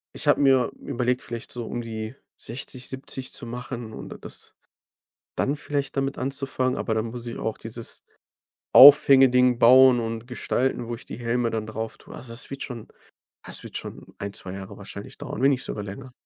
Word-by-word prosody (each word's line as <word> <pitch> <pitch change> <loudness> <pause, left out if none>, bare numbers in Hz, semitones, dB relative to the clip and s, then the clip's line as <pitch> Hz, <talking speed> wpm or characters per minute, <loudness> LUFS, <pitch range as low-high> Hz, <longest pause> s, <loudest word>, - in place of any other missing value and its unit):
Ich - - -6
habe 145 - +4
mir 135 -3 +4
überlegt, 125 +1 -1
vielleicht 115 -1 -7
so 120 -1 -5
um 120 - -3
die 110 +1 -6 0.3
60, 130 -1 -8
70 130 0 -7
zu - - -6
machen 120 -1 -6
und - - -8
d - - -8
das - - -12 0.8
dann 140 +2 0
vielleicht 145 -1 -3
damit 135 0 -1
anzufangen, 130 -1 -1
aber 110 - -1
dann 110 +1 0
muss 120 +1 -7
ich 120 - -5
auch 110 - -3
dieses 115 +1 -8 0.7
Aufhänge-Ding 130 -3 +8
bauen 130 +1 +7
und 115 +1 -4
gestalten, 125 -1 -1
wo 120 - -3
ich - - -13
die - - -8
Helme 120 0 0
dann 110 -1 -3
drauf 110 0 -5
tue. - - -14
Also, 125 - -10
das 115 - -7
wird 135 0 -5
schon 120 -4 -7 0.5
ah, - - -16
das - - -7
wird - - -6
schon - - -9
ein, 100 0 -5
2 95 -2 -7
Jahre 95 +1 -8
wahrscheinlich 100 0 -10
dauern, - - -6
wenn 135 - +6
nicht 130 -2 0
sogar 105 - -5
länger. 125 +6 -8
120 Hz, 195 wpm, -25 LUFS, 115-130 Hz, 0.8 s, Aufhänge-Ding